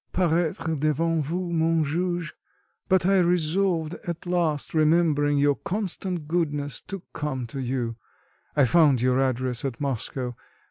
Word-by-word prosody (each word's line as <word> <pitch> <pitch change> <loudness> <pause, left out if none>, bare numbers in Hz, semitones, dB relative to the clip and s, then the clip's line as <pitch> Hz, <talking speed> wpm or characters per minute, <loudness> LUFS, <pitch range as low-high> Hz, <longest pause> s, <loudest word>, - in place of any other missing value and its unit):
paraître 165 -2 +1
devant 160 +2 +1
vous, 170 +4 -2
mon 165 -1 +2
juge; 175 +2 -2 0.6
but 185 -2 +3
I 195 0 +4
resolved 175 -1 +1
at 170 0 -4
last, 170 -5 0
remembering 155 -2 +3
your 145 0 +4
constant 185 -4 -3
goodness, 150 -4 -1
to 195 -2 -6
come 135 -4 -3
to 125 +4 -7
you; 125 -3 -2 0.6
I 145 -3 +5
found 145 -2 +4
your 125 +2 +2
address 130 -2 0
at 130 -4 -3
Moscow. 130 -2 -3
155 Hz, 135 wpm, -25 LUFS, 140-175 Hz, 0.6 s, I